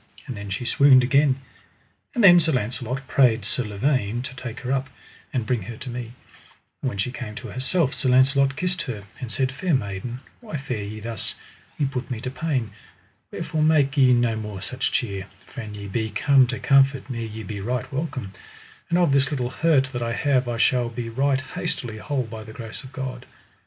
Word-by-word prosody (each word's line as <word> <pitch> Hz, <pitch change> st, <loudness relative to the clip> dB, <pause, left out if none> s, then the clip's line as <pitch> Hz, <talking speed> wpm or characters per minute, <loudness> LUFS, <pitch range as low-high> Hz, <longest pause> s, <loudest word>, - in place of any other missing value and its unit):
and 130 Hz, -4 st, -5 dB
then 100 Hz, -1 st, -7 dB
she 100 Hz, +6 st, -3 dB
swooned 130 Hz, 0 st, +6 dB
again. 140 Hz, +1 st, +3 dB, 0.8 s
And 240 Hz, -, +2 dB
then 175 Hz, -3 st, +9 dB
Sir 160 Hz, -1 st, +1 dB
Launcelot 125 Hz, +3 st, -2 dB
prayed 120 Hz, -6 st, +3 dB
Sir 125 Hz, -, 0 dB
Lavaine 120 Hz, +1 st, 0 dB
to 135 Hz, +1 st, -6 dB
take 125 Hz, -1 st, -6 dB
her 130 Hz, 0 st, -3 dB
up: 135 Hz, +1 st, 0 dB, 0.4 s
And 125 Hz, -5 st, -1 dB
bring 120 Hz, 0 st, 0 dB
her 110 Hz, +5 st, -7 dB
to 130 Hz, -, -7 dB
me. 120 Hz, -1 st, -6 dB, 0.7 s
And 130 Hz, -, 0 dB
when 100 Hz, -, -6 dB
she 100 Hz, +5 st, -1 dB
came 120 Hz, -4 st, -6 dB
to -, -, -7 dB
herself 135 Hz, +3 st, +1 dB
Sir 130 Hz, -, +1 dB
Launcelot 135 Hz, +2 st, +4 dB
kissed 180 Hz, +3 st, 0 dB
her, 105 Hz, -4 st, -5 dB, 0.2 s
and 120 Hz, -3 st, -5 dB
said: 130 Hz, +1 st, +1 dB
Fair 165 Hz, +4 st, 0 dB
maiden, 115 Hz, +2 st, -3 dB, 0.2 s
why 215 Hz, -10 st, -5 dB
fare 125 Hz, -5 st, -4 dB
ye 105 Hz, +2 st, -6 dB
thus? 115 Hz, +1 st, -3 dB, 0.4 s
ye 145 Hz, -, +1 dB
put 130 Hz, -2 st, -3 dB
me 125 Hz, -4 st, -3 dB
to 125 Hz, -, -4 dB
pain; 135 Hz, -7 st, -1 dB, 0.6 s
wherefore 155 Hz, -, -2 dB
make 155 Hz, -2 st, +4 dB
ye 130 Hz, -3 st, +6 dB
no 120 Hz, -2 st, +3 dB
more 105 Hz, -3 st, -5 dB
such 130 Hz, +7 st, -2 dB
cheer, 100 Hz, -7 st, -2 dB, 0.2 s
for 125 Hz, -, -8 dB
an 105 Hz, -2 st, -7 dB
ye 100 Hz, -1 st, -7 dB
be 110 Hz, +3 st, -1 dB
come 130 Hz, +5 st, +4 dB
to 125 Hz, +1 st, -3 dB
comfort 135 Hz, -1 st, +4 dB
me 120 Hz, -3 st, -4 dB
ye 110 Hz, 0 st, -6 dB
be 100 Hz, 0 st, -5 dB
right 125 Hz, +5 st, -3 dB
welcome; 130 Hz, -9 st, -3 dB, 0.6 s
and 170 Hz, -, +3 dB
of 175 Hz, -5 st, +4 dB
this 135 Hz, -1 st, +3 dB
little 125 Hz, -4 st, -2 dB
hurt 140 Hz, -2 st, +2 dB
that 120 Hz, -, -3 dB
I 115 Hz, 0 st, -1 dB
have 135 Hz, -2 st, +2 dB
I 120 Hz, -1 st, -2 dB
shall 120 Hz, 0 st, +3 dB
be 115 Hz, 0 st, -5 dB
right 135 Hz, +3 st, +1 dB
hastily 115 Hz, -3 st, -4 dB
whole 140 Hz, +2 st, -1 dB
by 110 Hz, -1 st, -8 dB
the 110 Hz, 0 st, -11 dB
grace 115 Hz, +4 st, -8 dB
of 130 Hz, -, -11 dB
God. 130 Hz, -3 st, -5 dB
125 Hz, 210 wpm, -24 LUFS, 115-135 Hz, 0.8 s, then